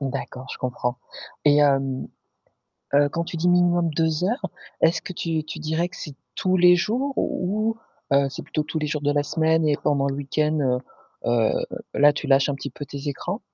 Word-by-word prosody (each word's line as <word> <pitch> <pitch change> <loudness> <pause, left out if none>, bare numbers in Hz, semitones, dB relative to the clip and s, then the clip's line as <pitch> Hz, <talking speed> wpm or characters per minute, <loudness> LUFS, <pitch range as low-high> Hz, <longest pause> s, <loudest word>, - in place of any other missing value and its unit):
D'accord, 130 -1 -4
je - - -8
comprends 125 -1 -2 0.5
et 145 -1 +6
hem, 135 -2 +2 0.9
heu, 145 0 +5
quand 170 +3 -2
tu 170 - -6
dis 170 +2 +1
minimum 175 -1 +3
2 160 +1 0
heures. 235 +8 0 0.3
Est-ce 165 +1 +3
que - - -6
tu 165 -2 -2
tu 155 - -7
dirais 160 +3 -1
que - - -13
c'est 150 - -7 0.2
tous 185 0 +2
les 180 0 +7
jours 235 +10 0
ou 215 +5 0 0.4
heu, 140 0 +4
c'est 135 - -7
plutôt 155 - -2
tous 160 - -4
les 150 - -1
jours 150 0 -2
de 145 - +2
la 145 0 +1
semaine 160 +1 +2
et 150 -1 +3
pendant 140 -1 +2
le 140 - -1
week-end, 150 +2 0
heu 125 -3 +2 0.5
heu, 115 -2 +3 0.4
là 145 +1 +6
tu 145 0 -5
lâches 135 0 +4
un 145 - 0
petit 135 - -6
peu 145 - -7
tes 140 +1 -6
écrans? 175 - -3
150 Hz, 205 wpm, -24 LUFS, 140-175 Hz, 0.9 s, les